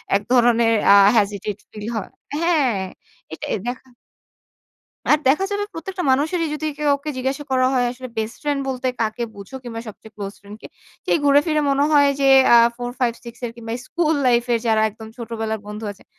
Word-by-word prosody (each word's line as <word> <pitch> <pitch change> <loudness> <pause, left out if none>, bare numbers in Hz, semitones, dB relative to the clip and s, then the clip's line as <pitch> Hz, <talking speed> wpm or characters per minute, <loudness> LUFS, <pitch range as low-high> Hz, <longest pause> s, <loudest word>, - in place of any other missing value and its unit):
এক 200 - +2
ধরনের 235 -2 +4 0.2
আ - - +8 0.2
hesitate 205 0 -1
feel 210 -1 -8
হয়। 210 - -4 0.3
হ্যাঁ 300 - +2 0.6
এটাই - - -3
দেখা 255 +1 -5 1.2
আর 300 - +6
দেখা 305 +9 +3
যাবে 410 0 -1
প্রত্যেকটা 360 +3 -5
মানুষেরই 320 +5 +1
যদি 310 +1 -3
কেউকে 290 0 0
জিজ্ঞাসা 265 +3 -2
করা 255 -1 +3
হয় 250 -1 +2
"আসলে 255 +1 -8
বেস্ট 220 +2 -2
ফ্রেন্ড 290 -2 -1
বলতে 260 0 -2
কাকে 225 +2 -1
বুঝো? 200 +6 -10
কিংবা 230 -2 -6
সবচেয়ে 215 +1 -12
ক্লোজ 200 -1 -6
ফ্রেন্ড 205 +1 -12
কে?" - - -9 0.4
সেই - - +2
ঘুরে 285 0 +6
ফিরে 305 -2 +1
মনে 275 +1 +2
হয় 285 -2 +5
যে 275 - +4 0.3
আ - - +9 0.2
4 245 0 -5
5 240 -2 +1
6 235 0 -10
এর 230 - -5
কিংবা 225 -1 -8 0.2
স্কুল 325 -2 +1
লাইফ 240 -1 +3
এর 230 - +2
যারা 220 -1 +3
একদম 220 +1 -12
ছোটবেলার 225 -2 -4
বন্ধু 210 +1 -7
আছেন, 200 - -17
245 Hz, 185 wpm, -21 LUFS, 220-285 Hz, 1.2 s, আ